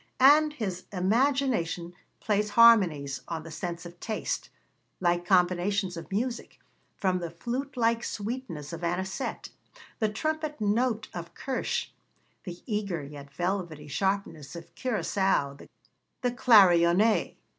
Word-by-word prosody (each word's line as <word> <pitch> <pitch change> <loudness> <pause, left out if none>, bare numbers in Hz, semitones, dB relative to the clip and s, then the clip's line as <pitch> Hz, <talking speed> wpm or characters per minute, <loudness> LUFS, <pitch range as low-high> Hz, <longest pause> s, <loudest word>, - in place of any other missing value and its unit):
And 300 +3 +6
his 190 -9 -4
imagination 205 -4 +1 0.3
plays 210 0 0
harmonies 185 -12 +5
on 160 -1 -4
the 165 - -10
sense 170 +2 -5
of 175 0 -11
taste, 220 -2 -3 0.5
like 175 -1 +1
combinations 185 +1 +2
of 170 +3 -9
music, 235 +5 -3 0.4
from 185 -2 +1
the 170 -1 -4
flute 250 - -5
like 230 0 +2
sweetness 205 - -5
of 165 +1 -7
anisette, 190 +8 -3 0.5
the 220 - +2
trumpet 310 +6 -3
note 220 +2 0
of 170 -1 -7
kirsch, 265 -1 -2 0.6
the 175 -2 -8
eager 200 - -2
yet 140 0 -10
velvety 175 -2 -3
sharpness 170 -4 -2
of 170 -1 -10
curaçao, 190 - -1 0.5
the 250 -2 +1
clarionet. 205 -5 +5
190 Hz, 120 wpm, -28 LUFS, 170-230 Hz, 0.6 s, And